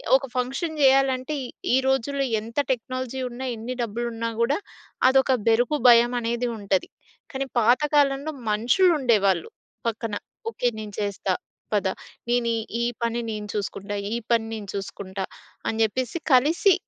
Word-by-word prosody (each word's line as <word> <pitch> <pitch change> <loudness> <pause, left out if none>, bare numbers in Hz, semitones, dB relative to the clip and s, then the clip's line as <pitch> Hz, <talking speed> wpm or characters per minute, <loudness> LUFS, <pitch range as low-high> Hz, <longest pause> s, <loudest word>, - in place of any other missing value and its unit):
ఒక 270 0 +1
ఫంక్షన్ 275 +6 -2
జేయాలంటే 270 +1 +4 0.4
ఈ - - +6
రోజుల్లో 270 +1 +1
ఎంత 230 +5 -10
టెక్నాలజీ 255 +1 -3
ఉన్నా, 245 +2 -6
ఎన్ని 230 +3 -5
డబ్బులు 235 +1 -2
ఉన్నాకూడా, 230 +4 0 0.5
అదొక 265 0 +4 0.2
బెరుకు, 240 +6 +3
భయమనేది 240 0 +4
ఉంటది. 195 -2 0 0.4
కానీ 270 0 -2
పాత 240 +6 +4
కాలంలో 285 +1 +3 0.2
మనుషులు 245 - +4
ఉండేవాళ్ళు 200 -9 +2 0.4
పక్కన. 225 -1 -2 0.4
"ఓకే. 245 - -1
నేను 210 -1 -7
చేస్తా 200 -2 -1 0.4
పదా! 195 -2 +1 0.4
నేను 240 -1 +2 0.3
ఈ - - +1 0.2
పని 235 0 0
నేను 210 -1 -5
చూసుకుంటా! 205 0 -3 0.2
ఈ - - 0 0.2
పని 230 -1 +3
నేను 210 -2 -6
చూసుకుంటా!" 195 -1 -5 0.4
అని 225 - -1
చెప్పేసి 255 +7 -1 0.2
కలిసి, 320 +9 +5
240 Hz, 130 wpm, -25 LUFS, 215-265 Hz, 0.5 s, ఈ